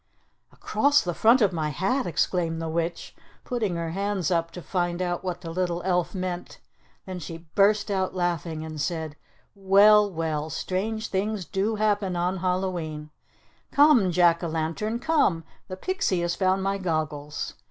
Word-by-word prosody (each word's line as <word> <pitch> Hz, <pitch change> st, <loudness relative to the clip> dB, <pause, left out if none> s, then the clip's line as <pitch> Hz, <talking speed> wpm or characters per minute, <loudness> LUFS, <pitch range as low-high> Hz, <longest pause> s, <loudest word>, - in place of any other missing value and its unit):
"Across 285 Hz, +1 st, +2 dB
the 175 Hz, -, -2 dB
front 230 Hz, +9 st, +4 dB
of 200 Hz, -3 st, +2 dB
my 155 Hz, -2 st, -1 dB
hat!" 195 Hz, -, -1 dB
exclaimed 165 Hz, -1 st, 0 dB
the 165 Hz, -, -3 dB
witch, 165 Hz, +1 st, -3 dB, 0.3 s
putting 220 Hz, -8 st, -2 dB
her 165 Hz, -1 st, -3 dB
hands 195 Hz, -1 st, -1 dB
up 165 Hz, -1 st, +1 dB
to 180 Hz, -, -7 dB
find 175 Hz, -2 st, -1 dB
out 175 Hz, -1 st, -2 dB
what 180 Hz, -2 st, -4 dB
the 165 Hz, -, -6 dB
little 175 Hz, 0 st, -2 dB
elf 180 Hz, 0 st, 0 dB
meant. 180 Hz, -1 st, -4 dB, 0.5 s
Then 185 Hz, -1 st, -6 dB
she 165 Hz, +1 st, -8 dB
burst 205 Hz, +1 st, +3 dB
out 190 Hz, -1 st, -1 dB
laughing, 170 Hz, -3 st, -2 dB
and 155 Hz, -2 st, -6 dB
said, 160 Hz, -2 st, -3 dB, 0.4 s
"Well, 205 Hz, +2 st, +5 dB
well! 160 Hz, -3 st, -2 dB
What 155 Hz, -, -7 dB
strange 220 Hz, +4 st, -2 dB
things 200 Hz, 0 st, -2 dB
do 200 Hz, +5 st, -1 dB
happen 205 Hz, -3 st, 0 dB
on 180 Hz, +2 st, 0 dB
Hallowe'en! 175 Hz, -5 st, -2 dB, 0.6 s
Come, 285 Hz, -10 st, +5 dB
Jack 170 Hz, 0 st, +3 dB
o' -, -, -1 dB
Lantern! 165 Hz, +8 st, -2 dB
Come! 245 Hz, -, +1 dB, 0.2 s
The 185 Hz, -, -6 dB
pixie 200 Hz, -, -1 dB
has 175 Hz, 0 st, 0 dB
found 190 Hz, +1 st, +1 dB
my 195 Hz, 0 st, -1 dB
goggles. 155 Hz, -4 st, -3 dB
180 Hz, 165 wpm, -26 LUFS, 165-200 Hz, 0.6 s, Well